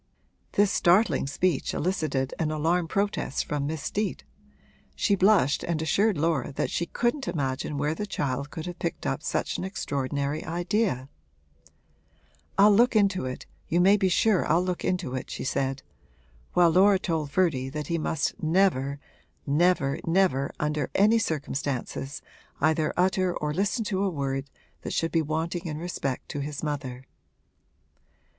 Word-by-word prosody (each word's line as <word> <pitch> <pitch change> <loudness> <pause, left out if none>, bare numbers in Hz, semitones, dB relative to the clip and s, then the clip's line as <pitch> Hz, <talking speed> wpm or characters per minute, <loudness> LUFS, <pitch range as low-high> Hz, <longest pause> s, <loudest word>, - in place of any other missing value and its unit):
This 205 -1 +3
startling 175 -6 +3
speech 150 +1 0
elicited 150 -7 -1
an 160 - 0
alarmed 165 +2 0
protest 200 -8 -1
from 145 -1 -2
Miss 155 -2 -4
Steet; 210 0 -2 0.7
she 205 - +1
blushed 190 -7 +3
and 170 -2 -1
assured 195 +6 +2
Laura 155 -4 0
that - - -2
she 170 - -1
couldn't 240 - -1
imagine 140 -3 -2
where 145 +2 0
the 210 +6 -4
child 140 -5 -2
could 160 0 -6
have 175 -1 -7
picked 170 - -3
up 70 - -1
such - - -2
an - - -3
extraordinary 140 -4 -2
idea. 175 - -1 1.5
'I'll 205 +2 +7
look 240 +2 +4
into 195 -9 +2
it 130 - -6 0.2
you 170 - +1
may 195 +3 +6
be 195 -2 +2
sure 200 +2 +3
I'll 165 +4 +3
look 180 -1 -3
into 180 -8 -1
it,' 130 - -4
she - - -5
said; 135 +1 -1 0.7
while 175 -2 +5
Laura 195 +3 +5
told 160 -6 -2
Ferdy 140 -6 +1
that 150 +2 -4
he 170 +3 -1
must 155 -1 -2
never, 155 -5 +2 0.5
never, 145 -1 +2
never, 165 -6 +2
under 150 -2 -1
any 215 +3 +5
circumstances, 140 - -3 0.4
either 155 +1 +2
utter 185 0 +2
or 150 0 -2
listen 205 +6 0
to 195 -2 -1
a 200 - +2
word 135 -4 -3 0.3
that - - -5
should 165 - 0
be 165 - +2
wanting 160 +3 -2
in 150 -2 -4
respect 155 -6 -3
to 145 - -4
his 145 +1 -5
mother. 135 -4 -4
160 Hz, 155 wpm, -27 LUFS, 140-185 Hz, 1.5 s, I'll